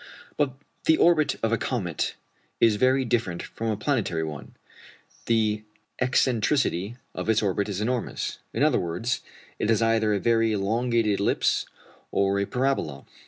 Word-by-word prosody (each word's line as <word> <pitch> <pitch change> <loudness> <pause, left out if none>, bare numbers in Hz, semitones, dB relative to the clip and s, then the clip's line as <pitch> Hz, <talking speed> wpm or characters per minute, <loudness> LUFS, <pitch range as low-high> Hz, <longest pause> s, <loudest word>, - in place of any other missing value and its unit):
But 145 -3 +1 0.3
the 160 - +5
orbit 165 -3 +4
of 115 - +2
a 115 - +1
comet 95 - -2 0.4
is 110 -2 +4
very 130 +3 +3
different 115 -8 -1
from 115 - -5
a 110 -2 0
planetary 105 - 0
one. 75 -3 -7 0.7
The 110 -2 +2 0.4
excentricity 120 - +1 0.2
of - - -4
its 110 -1 +3
orbit 100 +1 0
is 100 0 -3
enormous 120 +1 -2
in 120 - 0
other 150 -4 +4
words, 90 +8 -2 0.4
it 105 - 0
is 115 - +4
either 115 -1 +2
a - - 0
very 115 +1 +2
elongated 110 +1 +1
ellipse 100 - +1 0.4
or 100 0 +1
a 100 - -1
parabola. 125 - -1
115 Hz, 150 wpm, -26 LUFS, 100-125 Hz, 0.7 s, the